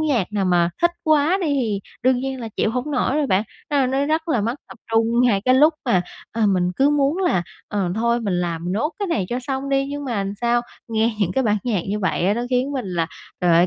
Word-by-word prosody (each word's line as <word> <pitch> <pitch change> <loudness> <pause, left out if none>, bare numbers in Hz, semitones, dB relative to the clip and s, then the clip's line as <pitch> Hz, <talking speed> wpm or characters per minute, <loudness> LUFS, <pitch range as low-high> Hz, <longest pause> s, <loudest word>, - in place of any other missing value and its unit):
nhạc 255 - 0
nào 205 -2 0
mà 175 -2 +3
thích 345 - +5
quá 310 +3 +3
đi 355 - 0
thì 245 -9 0 0.2
đương 255 0 +4
nhiên 265 0 -4
là 230 - -5
chịu 220 - +1
hổng 250 +5 -3
nổi 280 -1 +1
rồi 300 -2 +1
bạn, 190 -4 +2 0.3
a, 280 -3 +2
nó 270 +2 0
rất 320 +2 0
là 255 -8 +2
mất 230 +4 -1
tập - - -12
trung 230 +1 +3
ngay 225 -6 +3
cái 255 - +5
lúc 305 +4 +5
mà, 190 -9 +2 0.3
ờ, 220 -1 +1
mình 180 -2 +2
cứ 275 +2 +4
muốn 290 +3 +2
là, 350 - +2 0.3
ờ, 200 -3 -1
thôi 235 +2 +1
mình 200 -5 -1
làm 170 0 -2
nốt 265 - 0
cái 405 - -1
này 210 - 0
cho 245 - -1
xong 265 +1 -3
đi, 275 0 +1
nhưng 285 +1 -5
mà 240 -6 -2
làm 195 +1 -4
sao? 240 0 +2 0.3
Nghe 225 0 +1
những 190 -4 +1
cái 265 -1 +1
bản 210 -2 +2
nhạc 220 -7 +1
như 205 +2 -1
vậy 185 -2 0
á, 200 - +3
nó 235 - -2
khiến 255 +3 +1
mình 260 -6 -3
là, 170 -2 0 0.3
trời 180 - +3
ơi, 175 +2 +5
240 Hz, 260 wpm, -22 LUFS, 200-275 Hz, 0.3 s, thích